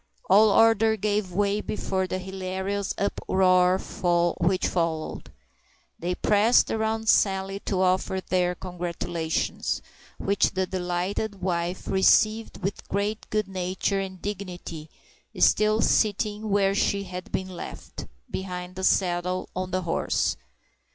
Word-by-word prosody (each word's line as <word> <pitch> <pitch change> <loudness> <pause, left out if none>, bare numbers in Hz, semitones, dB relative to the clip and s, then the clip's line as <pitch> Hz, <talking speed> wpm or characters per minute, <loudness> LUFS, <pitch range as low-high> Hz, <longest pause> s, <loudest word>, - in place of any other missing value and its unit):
All 210 +3 +7
order 225 0 +4
gave 210 -2 -1
way 200 +3 +1
before 190 -3 -2
the 185 - -2
hilarious 190 +1 -3
uproar 185 -2 +3 0.6
which 185 +2 +1
followed. 165 -3 -2 0.7
They 180 +2 -2
pressed 215 +5 +3
around 220 0 -1
Sally 195 -1 +2
to 190 -2 +1
offer 185 +1 +1
their 180 -1 0
congratulations, 175 -2 -3 0.3
which 200 +1 +1
the 190 0 +1
delighted 185 +2 -3
wife 175 0 -2
received 215 +2 +3
with 195 +2 -3
great 205 +2 -2
good 215 -2 0
nature 190 +1 -1
and 190 -1 -5
dignity, 180 -5 -6 0.5
still 215 +1 +4
sitting 210 0 +1
where 195 -1 +3
she 200 0 +1
had 180 -1 -8
been 190 0 -2
left—behind 180 - -7
the 190 - -4
saddle, 180 -1 +1
on 185 0 -3
the 185 0 -1
horse. 165 - 0
190 Hz, 115 wpm, -26 LUFS, 180-205 Hz, 0.7 s, All